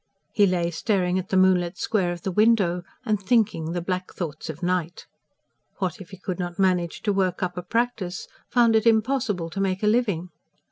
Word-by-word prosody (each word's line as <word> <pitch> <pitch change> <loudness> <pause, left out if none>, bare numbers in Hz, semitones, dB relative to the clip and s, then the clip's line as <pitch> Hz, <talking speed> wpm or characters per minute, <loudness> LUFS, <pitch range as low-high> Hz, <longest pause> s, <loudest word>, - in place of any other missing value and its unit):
He 205 -1 +5
lay 175 -2 0
staring 185 0 0
at 185 - -7
the 190 - +2
moonlit 185 -1 +3
square 195 -6 0
of 175 -1 -7
the 190 - -2
window, 200 -4 +3 0.2
and 210 -3 0
thinking 195 -6 +1
the 175 - -2
black 185 0 -3
thoughts 155 -4 -6
of 160 +3 -7
night. 180 -1 -1 0.7
What 185 -2 -3
if 180 - -11
he 190 - -10
could 185 -1 -5
not 175 -1 -4
manage 180 -3 +1
to 205 - +1
work 185 -2 0
up 180 -1 -2
a 180 - -3
practice?... 215 -2 -2 0.2
found 235 -2 +4
it 220 +1 +3
impossible 220 -6 +1
to 195 - -3
make 195 0 -1
a - - +3
living? 210 -6 +1
185 Hz, 195 wpm, -24 LUFS, 175-210 Hz, 0.7 s, He